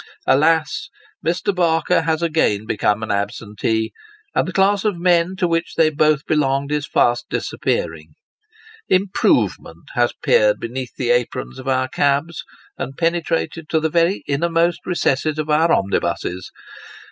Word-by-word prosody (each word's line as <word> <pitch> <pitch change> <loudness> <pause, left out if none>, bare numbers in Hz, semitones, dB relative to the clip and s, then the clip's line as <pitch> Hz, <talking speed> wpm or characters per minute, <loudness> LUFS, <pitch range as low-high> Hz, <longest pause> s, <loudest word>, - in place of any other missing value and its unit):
Alas! 155 +2 +2 0.3
Mr. 175 +4 0
Barker 170 -1 +2
has 160 0 -1
again 155 -11 +1
become 105 0 0
an 110 - -3
absentee; 105 +2 -2 0.4
and - - +1
the - - -3
class 195 +1 +2
of 210 -5 0
men 175 +1 +2
to 185 -2 0
which 165 0 -1
they 160 -1 +4
both 155 -1 +2
belonged 140 -2 0
are 150 0 0
fast 120 -4 +1
disappearing. 80 -2 -3 0.7
Improvement 190 +1 0
has - - +2
peered - - +3
beneath 125 +1 -6
the 120 -2 0
aprons 120 - -1
of 130 - -9
our 130 -1 +1
cabs, 145 +4 0 0.4
and 135 - -5
penetrated 165 -1 -1
to 160 - +2
the 160 0 0
very 170 +4 +1
innermost 165 +3 0
recesses 155 -3 0
of 155 0 -2
our 160 +2 +3
omnibuses. 90 -1 -1
155 Hz, 140 wpm, -20 LUFS, 130-170 Hz, 0.7 s, they